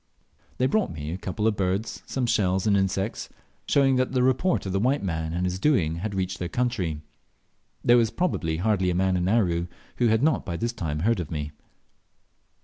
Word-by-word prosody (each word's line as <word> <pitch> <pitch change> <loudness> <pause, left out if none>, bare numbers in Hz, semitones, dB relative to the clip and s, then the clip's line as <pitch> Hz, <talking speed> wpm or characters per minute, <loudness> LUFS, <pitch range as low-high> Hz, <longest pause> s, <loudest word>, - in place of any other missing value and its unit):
They 130 - +2
brought 215 +9 +1
me 75 -1 -5
a 90 - -3
couple 100 +3 -3
of 110 -1 +2
birds, 95 +3 -2
some 130 -2 -1
shells 95 -5 +1
and 105 -2 +3
insects; 95 +2 -1 0.4
showing 135 -2 +3
that 130 +1 0
the 125 -1 +2
report 130 - +1
of 95 - -3
the 95 - 0
white 130 +5 +1
man 80 -3 -2
and 90 +2 -1
his 90 0 -2
doing 90 - +2
had 100 +3 -4
reached 95 0 -2
their 90 - -3
country. 95 -12 -1 0.8
There 120 +1 +6
was 115 -2 +3
probably 105 - -1
hardly 95 0 +1
a 90 - 0
man 95 +1 +2
in 90 0 0
Aru 90 -6 +1 0.3
who 120 - +3
had 110 +2 +2
not 155 -1 +2
by 85 -2 -4
this 120 +4 -2
time 80 -9 -3
heard 115 +2 +2
of 85 - -4
me. 75 -2 -4
95 Hz, 205 wpm, -25 LUFS, 90-120 Hz, 0.8 s, There